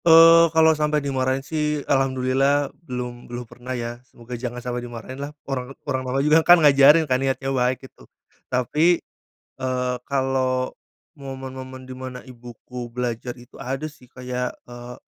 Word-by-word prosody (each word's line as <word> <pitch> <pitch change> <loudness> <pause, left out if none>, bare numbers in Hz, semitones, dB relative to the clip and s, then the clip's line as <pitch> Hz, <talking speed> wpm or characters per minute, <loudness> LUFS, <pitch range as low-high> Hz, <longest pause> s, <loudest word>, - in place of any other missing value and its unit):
Eee, 165 0 +8
kalau 160 0 +5
sampai 150 0 +1
dimarahin 135 -1 -1
sih, 150 -1 -1
alhamdulillah 135 +1 +1 0.2
belum, 125 -1 -5
belum 120 0 -6
pernah, 125 +2 -7
ya. 120 0 -5
Semoga 120 +1 -11
jangan 120 0 -4
sampai 125 0 -4
dimarahinlah. 120 +4 -7 0.2
Orang 135 -1 -4
orang 130 - -1
malah 130 +2 -1
juga 155 +2 +6
kan, 175 +2 +7
ngajarin 145 +1 +6
kan, 130 -2 +1
niatnya 135 0 -1
baik, 130 +1 0
gitu. - - -17 0.4
Tapi, 150 +8 +3 0.6
eee, 125 -1 -1
kalau 130 -2 0 0.4
momen-momen 130 -2 -8
di 130 - -8
mana 130 -1 -8
ibuku 120 0 -9
belajar 120 0 -4
itu, 120 +2 -14
ada 135 +3 -3
sih 150 -5 -11
kayak, 125 0 -4
eee, 120 0 -9
130 Hz, 145 wpm, -23 LUFS, 125-140 Hz, 0.6 s, Eee